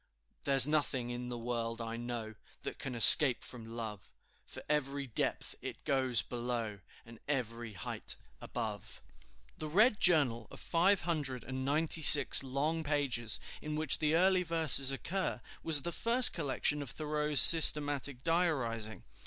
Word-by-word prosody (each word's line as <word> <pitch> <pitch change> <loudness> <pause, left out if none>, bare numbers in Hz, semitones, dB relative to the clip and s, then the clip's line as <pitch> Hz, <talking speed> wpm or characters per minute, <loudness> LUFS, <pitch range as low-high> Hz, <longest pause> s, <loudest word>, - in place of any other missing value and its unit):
"There's 135 -3 +4
nothing 140 -5 -3
in 125 0 -8
the 120 - -8
world, 115 -1 -6
I 115 0 -7
know, 120 -2 -8 0.3
That - - -9
can 130 -3 -7
escape 125 +3 +9
from 115 -3 -11
Love, 105 -4 -9 0.4
For - - -12
every 140 -1 -4
depth 120 - -5
it - - -10
goes 130 -4 -1
below, 120 -4 -7 0.3
And 115 -1 -17
every 120 -5 -6
height 90 - -6 0.3
above." - - -8 0.6
The 155 - -7
Red 210 +8 +1
Journal 135 - +1
of - - -14
five 185 +4 -1
hundred 145 -8 -5
and 130 +1 -8
ninety 155 +4 -2
six 150 0 +6
long 145 +5 -5
pages, 135 -7 -2 0.2
in 150 0 -7
which 155 -2 0
the 155 0 -2
early 185 +2 +1
verses 160 -6 +1
occur, 185 +4 -5 0.2
was 150 -4 0
the 170 - -5
first 235 +6 +3
collection 145 -1 -3
of 140 - -8
Thoreau's 150 -1 -1
systematic 145 -3 +6
diarizing. 130 -11 -4
140 Hz, 145 wpm, -30 LUFS, 120-155 Hz, 0.6 s, escape